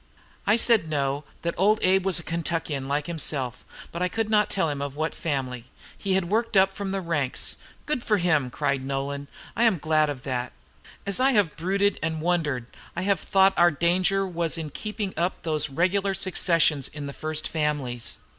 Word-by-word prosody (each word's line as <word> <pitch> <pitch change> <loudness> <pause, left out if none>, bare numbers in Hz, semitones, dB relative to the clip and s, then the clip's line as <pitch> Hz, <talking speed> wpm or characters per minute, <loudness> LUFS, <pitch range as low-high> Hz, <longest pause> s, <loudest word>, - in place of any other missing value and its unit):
I 215 - +5
said 225 -8 +3
no, 140 -1 -1 0.2
that 170 - 0
Old 210 +4 +4
Abe 190 +1 +3
was 190 - +4
a 170 - -5
Kentuckian 165 -5 -2
like 145 +1 0
himself, 145 -7 -2 0.3
but 170 - -5
I 180 - +3
could 225 +2 -2
not 210 -1 +4
tell 190 -4 +1
him 145 -2 -3
of 140 -1 -4
what 155 +2 -1
family; 130 -6 -3 0.3
he 195 - -2
had 190 -2 +1
worked 220 +2 +1
up 190 0 +5
from 200 -1 -4
the 195 0 -2
ranks. 150 -7 -1 0.3
'Good 295 -5 -1
for 210 - +2
him!' 155 -8 +2
cried 135 +1 -1
Nolan; 140 +1 -3 0.3
'I 230 - +2
am 225 -6 +4
glad 155 0 +2
of 135 -3 -5
that. 125 -2 -3 0.5
As 200 +3 0
I 265 +1 +4
have 205 -8 +2
brooded 195 +4 +1
and 160 0 -1
wondered, 155 -7 0 0.3
I 170 - -2
have 200 0 +2
thought 195 0 +4
our 175 0 +6
danger 180 +5 +2
was 170 -2 -1
in 155 -2 -5
keeping 210 - -4
up 175 +3 -1
those 155 -2 0
regular 190 +6 +1
successions 165 -6 +2
in 145 -1 -7
the 140 - -6
first 155 +1 -2
families.' 145 -7 -2
165 Hz, 195 wpm, -26 LUFS, 145-195 Hz, 0.5 s, our